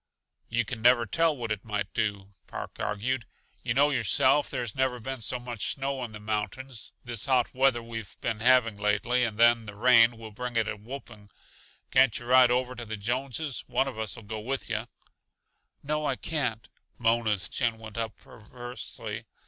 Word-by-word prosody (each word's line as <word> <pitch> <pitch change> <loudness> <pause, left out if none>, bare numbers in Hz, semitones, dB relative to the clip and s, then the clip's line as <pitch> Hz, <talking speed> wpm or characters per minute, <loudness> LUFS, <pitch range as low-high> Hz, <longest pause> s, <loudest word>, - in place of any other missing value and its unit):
"You 120 +1 +1
can 115 0 -5
never 120 0 +5
tell 160 +7 +2
what 115 -3 -4
it 105 -2 -2
might 105 -2 -3
do," 100 -3 -2
Park - - -7
argued. 115 +4 -2 0.4
"Yuh 120 -1 -1
know 145 +2 +4
yourself 135 +1 +3
there's 120 -6 -2
never 130 -2 0
been 130 +1 -5
so 125 - +1
much 120 -3 -2
snow 135 -1 -2
in 120 - -5
the 105 - -8
mountains. 110 +4 -4
This 120 -2 -3
hot 130 -3 +2
weather 130 -2 +3
we've 115 -4 -7
been 115 -2 -2
having 120 -2 +4
lately, 105 +5 +1
and 110 -3 -2
then 115 -1 +5
the 105 - -8
rain, 115 +1 +6
will 110 -1 -9
bring 125 +3 -5
it 115 -1 +2
a - - -2
whooping. 105 -2 -10 0.6
Can't 130 -3 +5
yuh 120 - -7
ride 125 0 +6
over 125 +1 +1
to 120 -1 -7
the 110 -1 -5
Jonses? 130 +6 -2
One 125 +2 +1
of 125 -5 -5
us'll 110 +1 -2
go 110 +1 -5
with 130 +5 -3
yuh." - - -2 1.0
"No, 150 +1 -1
I 135 - +1
can't." 125 -8 -2 0.3
Mona's 115 -4 +2
chin 120 -3 0
went 110 0 -8
up 115 -1 -3
perversely. 115 -1 -8
120 Hz, 180 wpm, -28 LUFS, 110-130 Hz, 1.0 s, rain